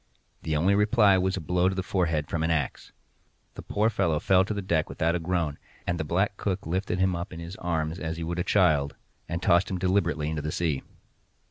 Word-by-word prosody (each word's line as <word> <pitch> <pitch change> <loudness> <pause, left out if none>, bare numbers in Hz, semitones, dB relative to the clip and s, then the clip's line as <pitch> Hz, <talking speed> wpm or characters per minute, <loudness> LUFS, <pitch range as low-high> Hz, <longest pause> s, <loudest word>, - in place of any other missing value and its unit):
The 80 -1 -2
only 90 +6 +3
reply 105 -1 +4
was 95 +1 0
a - - -2
blow 90 +2 0
on 95 0 +2
the 95 - -2
forehead 80 -6 0
from 80 - -2
an 80 - +1
axe. 80 -4 -2 0.6
The - - -8
poor 105 +2 0
fellow 85 -7 +1
fell 95 +3 +4
to 105 - -3
the 100 - -3
deck 80 -4 0
without 85 +1 0
a 90 - 0
groan, 80 -3 -1 0.3
and 85 - -1
the - - 0
black 95 +6 0
cook 100 -1 -2
lifted 90 +2 -1
him 95 -1 +2
up 85 +2 -5
in 85 - -8
his 85 +2 -7
arms 80 0 -2
as 80 0 -4
he 85 - -4
would 85 +2 -3
a - - +1
child, 80 -9 +2 0.3
and 85 +1 -3
tossed 85 +3 +4
him 95 - -2
deliberately 85 -5 +1
into 80 -1 -2
the 75 +1 -3
sea. 80 -6 -1
85 Hz, 230 wpm, -27 LUFS, 80-95 Hz, 0.6 s, reply